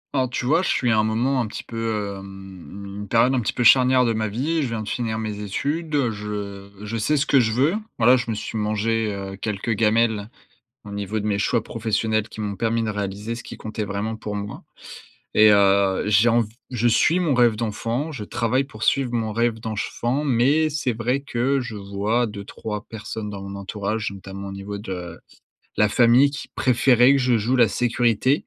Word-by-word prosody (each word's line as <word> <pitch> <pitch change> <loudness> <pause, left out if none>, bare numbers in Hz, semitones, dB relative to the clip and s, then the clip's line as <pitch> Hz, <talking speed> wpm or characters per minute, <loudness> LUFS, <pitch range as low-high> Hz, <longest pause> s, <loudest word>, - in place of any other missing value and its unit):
Alors 130 -2 +1
tu 125 - -3
vois, 155 +7 +3
je 190 - -2
suis 120 -2 +1
à 110 - +3
un - - +3
moment 120 +5 +1
un 115 - -2
petit - - -7
peu, 110 -3 -3
hem 95 -2 -11 0.2
une 105 - -6
période 120 +5 +3
un 130 - +2
petit 110 - -1
peu 125 - -2
charnière 130 +1 +6
de 115 - +1
ma 110 0 -1
vie, 145 +10 -1
je 140 - 0
viens 115 -2 -3
de - - -9
finir 110 -2 -2
mes 110 -2 -4
études, 150 - -2
heu, 130 -5 +2
je 105 -2 -6 0.2
je 115 +2 -3
sais 150 +8 +1
ce 140 - +1
que 140 - +4
je 110 -3 +2
veux. 135 +9 +2 0.2
Bah 115 - +1
là, 125 +2 +8
je 120 -2 -2
me 110 - -1
suis 105 - -6
mangé, 110 +1 0
heu, 95 -1 -6
quelques 105 +2 -3
gamelles 110 -1 +1 0.5
au 105 - -10
niveau 100 +1 -3
de - - -5
mes 100 -2 0
choix 110 +2 +1
professionnels 110 -1 -1
qui 110 - -8
m'ont 100 -2 -3
permis 115 +2 0
de 110 - -2
réaliser 105 +2 -4
ce 120 - -8
qui - - -9
comptait 110 -1 -5
vraiment 105 +3 -3
pour 105 -1 -5
moi 100 0 -6 0.7
et 110 0 +7
heu, 100 -1 +4
j'ai 105 +3 +4
env 115 0 +3 0.3
je 120 -1 +1
suis 160 +9 +3
mon 165 -7 +1
rêve 120 -2 +4
d'enfant, 115 +6 -2
je 130 -8 -6
travaille 120 +5 0
pour 110 -6 -13
suivre 130 +1 +1
mon 110 -2 -1
rêve 115 +1 +1
d'enfant, 120 +5 -2
mais 145 +4 +2
c'est 145 -5 -1
vrai 120 +4 0
que 135 0 0
je 125 -4 -5
vois 100 +4 -1
2-3 105 0 -6
personnes 110 -1 -6
dans 100 -1 -7
mon 100 0 -7
entourage, 105 +2 -3
notamment 100 0 -8
au - - -6
niveau 100 +1 -6
de 90 -4 -6 0.6
la 105 - +4
famille 120 +5 +5
qui 145 - -7
préféraient 125 0 +4
que 140 - +3
je 125 -2 +2
joue 115 +4 +1
la 120 -2 +6
sécurité. 120 +3 +1
110 Hz, 215 wpm, -23 LUFS, 105-125 Hz, 0.7 s, là